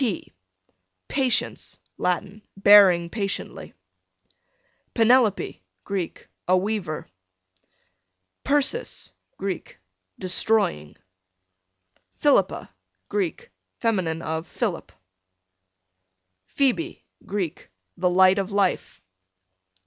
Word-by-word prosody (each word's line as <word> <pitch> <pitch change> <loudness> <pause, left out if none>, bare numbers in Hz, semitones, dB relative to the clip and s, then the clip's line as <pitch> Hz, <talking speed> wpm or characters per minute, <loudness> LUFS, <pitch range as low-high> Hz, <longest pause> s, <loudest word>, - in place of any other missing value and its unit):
P 230 -8 -2 0.8
Patience, 260 -4 0 0.2
Latin, 190 +3 -2 0.2
bearing 195 -4 +7
patiently. 200 -3 -4 1.2
Penelope, 230 - +3 0.2
Greek, 190 -4 -4 0.2
a 185 +1 +4
weaver. 190 -5 -3 1.4
Persis, 290 - 0 0.3
Greek, 190 -3 -5 0.4
destroying. 185 - +1 1.2
Philippa, 290 - +2 0.4
Greek, 415 +5 -3 0.3
fem. 210 -7 +1 0.2
of 160 +1 -3
Philip. - - -3 1.6
Phoebe, 280 +6 -1 0.2
Greek, 185 -5 -4 0.3
the 180 0 +1
light 185 +2 +5
of 195 +1 -3
life. 200 -2 -1
200 Hz, 70 wpm, -24 LUFS, 180-235 Hz, 1.6 s, bearing